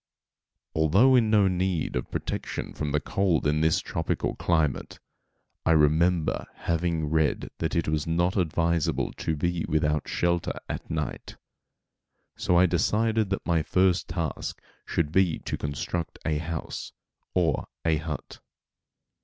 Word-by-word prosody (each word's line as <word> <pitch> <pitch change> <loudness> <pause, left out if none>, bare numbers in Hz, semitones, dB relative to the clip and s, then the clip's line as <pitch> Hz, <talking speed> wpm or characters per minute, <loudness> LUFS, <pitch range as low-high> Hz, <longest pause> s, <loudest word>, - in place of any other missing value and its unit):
Although 95 - +5
in 115 -3 +4
no 105 -2 +5
need 90 -3 0
of 60 - -2
protection - - -4
from 75 -1 -3
cold 95 -6 +1
in 75 +1 +2
this 80 +3 +3
tropical 80 -3 -2
climate, 80 -6 0 0.6
I 80 - +4
remembered 80 +2 +2
having 85 -1 -1
read 80 -2 +1
that 80 - -1
it 85 - +1
was 75 0 0
not 85 +3 +1
advisable 85 -3 +1
to 80 - -1
be 85 +2 -1
without 75 -1 +1
shelter 85 -1 0
at - - -5
night, 75 -2 -4 1.0
so 90 - +2
I 90 - +6
decided 110 +5 +1
that 95 - -2
my 85 -2 +2
first 90 +2 +2
task 85 -1 -3 0.3
should 75 -3 0
be 90 -2 +3
to - - -4
construct 75 +4 -3
a 75 -1 +1
house, 80 0 -5 0.4
or 85 -6 +1 0.2
a 80 -1 +3
hut. 75 -1 -6
85 Hz, 135 wpm, -27 LUFS, 80-90 Hz, 1.0 s, I